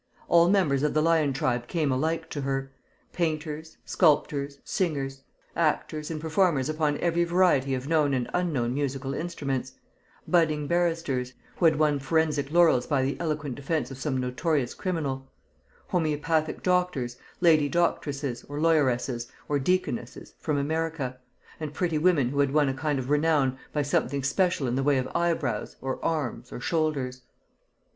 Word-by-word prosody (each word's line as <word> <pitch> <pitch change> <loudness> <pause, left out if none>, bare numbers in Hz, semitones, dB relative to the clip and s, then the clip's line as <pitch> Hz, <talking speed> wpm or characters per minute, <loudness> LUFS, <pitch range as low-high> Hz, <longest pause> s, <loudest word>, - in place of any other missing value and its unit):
All 170 0 +5
members 180 -9 +3
of 150 0 0
the 155 - +4
lion 160 -3 +3
tribe 125 -2 -1
came 155 -3 0
alike 160 +5 -1
to 145 - -3
her: 135 0 -2 0.4
painters, 160 -1 -3
sculptors, 145 -4 +2
singers; 135 -7 -2 0.3
actors, 155 -1 0
and 160 -2 -3
performers 160 -3 +1
upon 155 -1 0
every 170 0 +2
variety 170 -7 +3
of 130 +1 -5
known 150 -3 +2
and 125 -2 -1
unknown 145 -10 0
musical 135 -1 -2
instruments; 140 -5 -3 0.5
budding 155 -4 +2
barristers, 165 -7 0 0.2
who 175 - +1
had 160 -2 +6
won 150 -2 +2
forensic 145 0 0
laurels 165 -7 +4
by 140 -3 +1
the 135 +2 0
eloquent 150 -4 -2
defence 145 0 -2
of 135 - -8
some 135 -2 -1
notorious 130 +1 0
criminal; 140 -7 -3 0.6
homoeopathic 155 -1 0
doctors, 180 -10 0 0.2
lady 155 -4 +4
doctresses, 140 -6 -1
or 145 +1 -6
lawyeresses, 130 -6 +1 0.2
or 145 -1 +1
deaconesses, 135 -6 -2
from 150 -2 -1
America; 150 -3 -2 0.4
and 150 -2 -5
pretty 165 -3 0
women 155 -7 +3
who 140 +2 -2
had 140 -1 +3
won 150 0 +3
a - - -1
kind 145 +1 -1
of 130 +1 -3
renown 150 -3 +2 0.2
by 150 - 0
something 140 -1 0
special 155 +1 +1
in 120 - -1
the 135 - +1
way 140 0 +3
of 130 - -1
eyebrows, 160 -10 -1
or 130 0 -4
arms, 145 -6 -2
or - - -6
shoulders. 140 -4 -1
150 Hz, 155 wpm, -27 LUFS, 135-165 Hz, 0.6 s, had